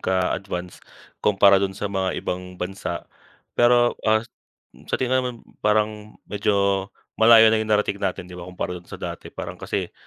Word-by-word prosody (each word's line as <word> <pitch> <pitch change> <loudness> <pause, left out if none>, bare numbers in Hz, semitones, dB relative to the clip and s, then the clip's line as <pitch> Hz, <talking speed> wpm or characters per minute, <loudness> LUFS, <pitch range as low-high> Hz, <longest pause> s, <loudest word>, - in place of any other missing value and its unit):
ka-advance 90 -1 -2 0.4
kumpara 100 -1 +5
dun 95 -1 -2
sa - - -5
mga 95 -2 -1
ibang 90 0 -5
bansa. 90 -1 -4 0.5
Pero, 120 0 +4 0.2
ah, 110 +1 +3 0.6
sa - - +1
tingin 130 0 +1
naman 125 -1 -3 0.3
parang 105 0 0
medyo 100 -1 0 0.3
malayo 110 0 +8
na 110 - +2
yung 110 - -3
narating 105 -1 +1
natin 95 -2 -2
‘di 90 - -13
ba 90 0 -8
kumpara 90 0 -4
dun 85 - -24
sa - - -7
dati. - - -7
Parang - - -7
kasi - - -3
100 Hz, 160 wpm, -23 LUFS, 95-110 Hz, 0.6 s, malayo